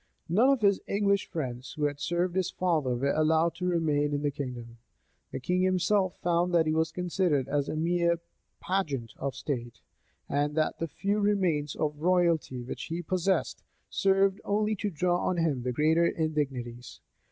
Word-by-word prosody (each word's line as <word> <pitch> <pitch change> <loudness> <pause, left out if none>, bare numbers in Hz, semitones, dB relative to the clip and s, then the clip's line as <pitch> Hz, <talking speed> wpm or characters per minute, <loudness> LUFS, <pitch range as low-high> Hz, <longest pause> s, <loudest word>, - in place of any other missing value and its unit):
None 220 +11 +4
of 275 -4 +3
his 200 -2 +3
English 200 0 +1
friends, 130 -6 -5
who 150 - -4
had 145 -1 -2
served 175 +4 -1
his 190 -2 +1
father, 155 -9 0
were 140 +3 0
allowed 160 +1 +2
to 180 - -2
remain 150 -4 +1
in 145 - -3
the 145 - +1
kingdom. 125 -4 -7 0.5
The - - -4
king 180 +7 0
himself 185 +1 +2
found 175 0 +2
that 165 -1 +4
he 155 - +1
was 160 0 +1
considered 175 -6 0
as 145 -1 -1
a - - -2
mere 170 +1 +1 0.4
pageant 145 -12 -2
of 135 -2 -3
state, 120 -4 -4 0.5
and 145 +1 0
that 155 -1 0
the 165 - -1
few 195 +7 -1
remains 185 -8 +1
of 150 -1 -2
royalty 170 -7 +1
which 120 - -6
he 170 +2 -4
possessed, 185 +2 0 0.3
served 195 0 +2
only 210 +1 +1
to 205 +1 -2
draw 175 +1 0
on 180 - 0
him 155 -6 +1
the 125 +1 -2
greater 160 +6 +3
indignities. 135 -7 -3
165 Hz, 175 wpm, -29 LUFS, 145-185 Hz, 0.5 s, None